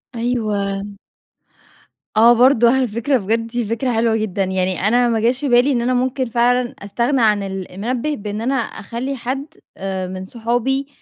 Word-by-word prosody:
أيوه. 210 -5 -1 1.3
آه، 235 +2 +7
برضه 240 -1 +5
على 260 -2 +1
فكرة 235 +5 0
بجد 225 +2 -1
دي 240 0 -2
فكرة 230 +4 -1
حلوة 225 0 +2
جدًا، 205 -3 -1
يعني 185 -1 -1
أنا 245 +1 +3
ما 225 -1 +1
جاش 250 +5 +1
بالي 250 +2 +4
إن 240 -2 +1
أنا 250 +1 +1
ممكن 255 +1 0
فعلًا 245 +1 +1
استغنى 235 +6 0
عن 210 -2 +3
ال 190 -1 -6
المنبِّه 245 +9 -2
بأن 210 -1 -5
أنا 255 +4 0
اخلي 240 +2 -4
حد 265 +3 -4 0.3
آآ، 190 -1 -3
من 185 0 -6
صحابي 245 +6 -1
235 Hz, 165 wpm, -19 LUFS, 205-250 Hz, 1.3 s, آه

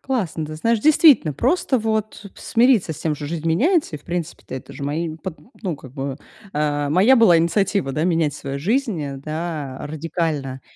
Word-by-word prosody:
Классно. 190 -12 -2
Ты 155 - -7
знаешь, 230 +8 +1
действительно, 290 - +5
просто, 270 - +1
вот, 215 -2 -3
смириться 235 -7 +2
с - - -11
тем, 155 -2 0
что 145 0 -6
жизнь 165 +1 -4
меняется 270 - +2
и, - - -10
в - - -26
принципе-то, 170 -5 -5
это 130 - -8
же - - -9
мои 155 +3 -2
под 165 0 -7 0.2
ну 180 -7 -2
как 130 -2 -13
бы, 135 -1 -4 0.4
э, 145 -1 0
моя 190 - +5
была 225 -8 +6
инициатива, 170 -2 +1
да, 155 +4 -1
менять 165 -4 +1
свою 140 0 -5
жизнь, 215 - 0
э, 140 -1 -5
да, 155 -2 -4
радикально? 150 -4 -3
165 Hz, 185 wpm, -21 LUFS, 145-210 Hz, 0.4 s, была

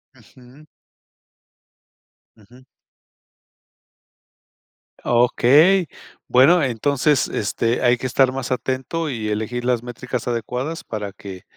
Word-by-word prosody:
Ujú. 130 +4 -19 1.7
Ujú. 120 +5 -20 2.4
Okey, 145 +9 +4 0.4
bueno, 145 +8 +5
entonces, 140 +3 +1
este, 115 +3 -2
hay 120 -1 +3
que - - -7
estar 130 +1 +2
más 130 -1 -5
atento 130 +5 -3
y 115 -4 -4
elegir 110 +3 -3
las 125 -2 +1
métricas 125 0 -6
adecuadas 125 +7 -4
para 105 -3 -6
que 95 -2 -11
125 Hz, 95 wpm, -20 LUFS, 115-135 Hz, 2.4 s, bueno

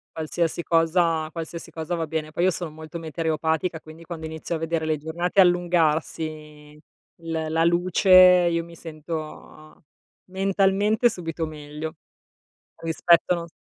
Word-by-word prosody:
Qualsiasi 165 +1 -2
cosa, 165 -1 +2
qualsiasi 165 0 -7
cosa 165 +2 -4
va 165 -1 -2
bene. 155 -1 -4
Poi 170 - -1
io 185 - +4
sono 170 -1 -3
molto 160 +2 -9
meteoropatica, 160 +1 -2
quindi 160 +1 -13
quando 165 -1 -7
inizio 160 +1 -5
a - - -1
vedere 165 0 -2
le 155 -1 0
giornate 170 +5 -2
allungarsi 155 -4 0 0.5
l 165 - -6 0.2
la 160 +1 +1
luce 175 +3 +1
io 180 -2 +7
mi 170 0 -13
sento 155 -1 -9 0.5
mentalmente 195 +4 +2
subito 165 -5 -3
meglio 155 +1 -7 0.9
rispetto 170 +2 +3
non 170 0 -5
s - - -19
165 Hz, 135 wpm, -24 LUFS, 155-175 Hz, 0.9 s, io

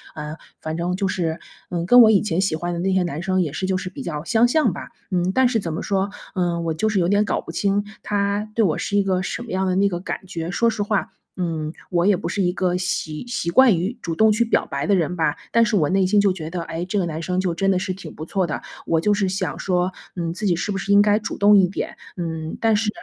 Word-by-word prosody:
啊， 150 +1 -6 0.2
反 155 0 -4
正 175 +2 -1
就 195 +1 -1
是， 170 -3 -2 0.3
嗯， 170 -1 -2
跟 245 +7 +8
我 225 - +8
以 210 -3 +5
前 185 -4 0
喜 190 -5 +1
欢 175 +2 -3
的 170 - -3
那 190 +2 0
些 185 -1 +2
男 170 -3 -3
生 185 0 +1
也 150 -4 -4
是 185 - -2
就 190 -1 +1
是 185 0 -5
比 - - -8
较 150 -4 -4
相 225 +7 +3
像 310 +5 +2
吧。 - - -7 0.2
嗯， 180 0 +1
但 260 +2 +4
是 240 -2 +1
怎 170 -5 -4
么 160 +6 -4
说， 195 0 0 0.2
嗯， 175 -3 -1
我 165 -1 -1
就 215 +8 0
是 205 - 0
有 175 -2 +2
点 205 +3 +3
搞 - - -1
不 - - -8
清， 200 0 +1 0.2
他 205 +1 -1
对 225 - +3
我 160 - +1
是 205 - -1
一 200 - +4
个 185 -1 0
什 215 - -4
么 235 - -9
样 190 0 0
的 185 - +1
那 200 +1 +3
个 175 -3 -2
感 190 - -5
觉。 170 -3 -5
说 230 +6 +2
实 220 - -3
话， 205 -1 -1 0.3
嗯， 160 -4 -2 0.2
我 175 -1 +2
也 205 -3 +4
不 195 - -4
是 200 - -1
一 180 -1 +2
个 180 -1 0
习 180 -2 -3
习 240 -8 -2
惯 255 -3 +6
于 190 +8 -2
主 165 -2 -3
动 220 +4 +5
去 215 +3 +2
表 225 - +1
白 140 +1 -3
的 205 - +4
人 180 -1 0
吧， 160 -4 +1 0.2
但 230 - +5
是 215 - 0
我 155 -7 +3
内 190 0 +3
心 205 +2 +3
就 200 -2 +3
觉 160 -4 -6
得， 170 0 -4
诶， 165 +1 -4
这 205 +3 -2
个 190 - +1
男 160 -1 -4
生 180 +2 -1
就 185 -2 0
真 195 +4 0
的 190 - +2
是 185 0 -2
挺 180 -4 -10
不 155 - -7
错 185 +1 0
的， 155 - -3 0.3
我 165 - +2
就 210 +4 +3
是 200 -2 +1
想 190 +1 -2
说， 180 -1 0 0.2
嗯， 170 -2 -2
自 210 +4 -4
己 175 - +3
是 190 +5 -2
不 195 - -2
是 195 +1 -2
应 200 0 +7
该 210 0 +3
主 210 - -5
动 205 +1 +6
一 190 -2 +5
点？ 185 - -5 0.2
嗯， 160 -2 -4
但 225 -1 +3
是， 210 +1 +1
185 Hz, 310 characters per minute, -22 LUFS, 170-205 Hz, 0.3 s, 跟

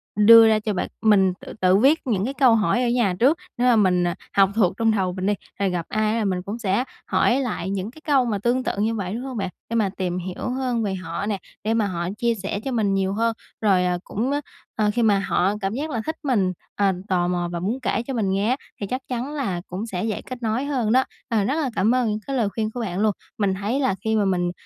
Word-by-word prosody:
đưa 225 +2 +8
ra 220 -1 +4
cho 215 0 -2
bạn 180 - -2
mình 195 -4 +4
tự - - -10
tự 185 +1 +5
viết 275 +9 +4
những 205 -5 +1
cái 265 - -2
câu 260 -5 +5
hỏi 225 +3 +2
ở 245 - +1
nhà 235 -6 +2
trước, 280 +8 +4 0.2
để 245 - +1
mà 250 -1 +5
mình, 185 -4 +3
à, 175 - -2 0.2
học 195 -1 +6
thuộc 200 -4 +3
trong 225 -1 +3
đầu 190 -4 0
mình 185 0 -4
đi, 205 - +3 0.3
rồi 200 -1 +1
gặp 175 -2 -2
ai 215 0 +1
là 225 -2 0
mình 185 -2 0
cũng 205 +4 -5
sẽ 205 +1 +1 0.2
hỏi 250 - +2
lại 230 -8 -3
những 195 +2 -3
cái 315 - -16
câu 275 -5 +3
mà 215 -4 -1
tương 240 +5 +1
tự - - 0
như 220 +3 0
vậy, 195 -3 -3
đúng 240 +3 -4
hông 260 -3 -5
bạn? 195 - -2 0.2
Để 230 - -2
mà 215 -4 +2
tìm 180 -2 -2
hiểu 185 +6 -4
hơn 250 -2 -1
về 195 -2 -1
họ 185 +2 -4
nè, 205 -2 -1 0.3
để 220 +2 +1
mà 220 -3 +1
họ 175 -1 -3
chia 235 0 +1
sẻ 200 0 -4
cho 270 - -2
mình 215 -5 +1
nhiều 195 0 0
hơn, 230 +2 +1 0.3
rồi, 190 -4 +3
à, 180 0 +1
cũng, 235 +7 -2
ờ, 290 +1 0 0.3
ờ, 210 -1 +2
khi 240 - 0
mà 205 -3 +4
họ 195 0 +1
cảm 195 +1 -1
giác 290 +6 -3
là 235 -6 -2
thích 315 - -2
mình, 205 -10 +1 0.2
à, 200 -1 +2
tò 180 -3 +1
mò 175 -1 -1
và 170 - -3
muốn 210 +9 -2
kể 240 -2 -1
cho 270 - -3
mình 220 -6 0
nghe 200 +4 +1
á, 255 - +3 0.3
thì 200 - -2
chắc 255 +4 -3
chắn 255 +3 -3
là 195 -12 -2
cũng 190 +5 -4
sẽ 185 -6 -4
dễ 220 -2 -2
kết 255 -1 -8
nối 225 +5 0
hơn 255 -7 0
đó. 260 +2 +5 0.3
Ờ, 225 -4 +2
rất 265 +8 0
là 310 -4 0
cảm 225 +6 +3
ơn 250 -3 +1
những 210 0 -1
cái 275 - -2
lời 225 -6 +1
khuyên 220 +1 -2
của 245 - -6
bạn 195 -5 -3
luôn. 215 0 +3 0.3
Mình 200 -3 +1
thấy 205 +7 -1
là 260 -8 +1
khi 220 0 +1
mà 210 -2 +2
mình 175 -2 +1
215 Hz, 275 wpm, -23 LUFS, 195-240 Hz, 0.3 s, đưa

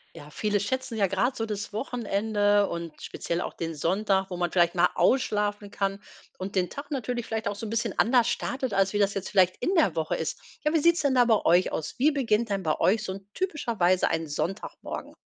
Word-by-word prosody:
Ja, 145 - -11
viele 205 +6 0
schätzen 235 +3 -3
ja 200 - +3
grad 235 +8 0
so 225 - -1
das 205 -2 -5
Wochenende 205 -3 +1
und 170 -2 -6
speziell 170 - -3
auch - - -4
den 165 -1 -4
Sonntag, 190 +4 +1
wo 180 - -4
man 175 -1 -1
vielleicht 175 -1 +3
mal 175 0 +4
ausschlafen 205 -5 +1
kann 195 0 -2 0.3
und 190 +2 -6
den 180 -2 +1
Tag 285 - -8
natürlich 245 -3 -2
vielleicht 220 -2 -3
auch 205 - -2
so 215 - -6
'n - - -5
bisschen 230 -2 -2
anders 240 0 +4
startet, 250 0 -2
als 195 0 +2
wie 205 - -1
das 200 -1 +2
jetzt 195 -1 -4
vielleicht 185 -2 +4
in 370 - +1
der 215 - +3
Woche 160 -1 -1
ist. - - -3 0.3
Ja, 300 - +2
wie 325 - +4
sieht's 340 +2 +4
denn 280 -3 +1
da 250 - +6
bei 225 -3 +3
euch 180 +2 +4
aus? 155 - -4
Wie 290 +5 +4
beginnt 235 -5 +1
denn 200 -1 -1
bei 155 -1 0
euch 215 +3 +2
so 190 - -3
'n 195 0 -10
typischerweise 235 - +1
ein 165 0 -1
Sonntagmorgen? 170 +7 -5
205 Hz, 225 wpm, -27 LUFS, 185-235 Hz, 0.3 s, da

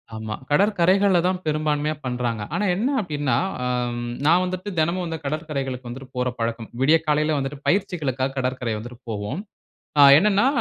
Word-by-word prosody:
ஆமா. 110 -1 -5 0.2
கடற்கரைகள்ல 195 +2 +3
தான் 185 0 0
பெரும்பான்மையா 155 0 0
பண்றாங்க. 120 -3 -2
ஆனா 210 - 0
என்ன 225 +8 0
அப்படின்னா 145 - -1 0.3
அம் 120 -1 -2 0.2
நான் 170 +4 +5
வந்துட்டு 185 +2 -4
தினமும் 170 +4 +1
வந்து 165 -1 -4
கடற்கரைகளுக்கு 140 -4 -3
வந்துட்டு 130 +2 -8
போற 125 0 +1
பழக்கம். 115 0 -2
விடிய 155 +4 +5
காலையில 150 0 +2
வந்துட்டு 135 +1 -3
பயிற்சிகளுக்காக 150 -9 0
கடற்கரை 125 -3 -1
வந்துட்டு 120 +1 -10
போவோம். 105 - -3 0.6
அ - - +8
என்னன்னா, 205 +5 +4
145 Hz, 145 wpm, -23 LUFS, 125-175 Hz, 0.6 s, அ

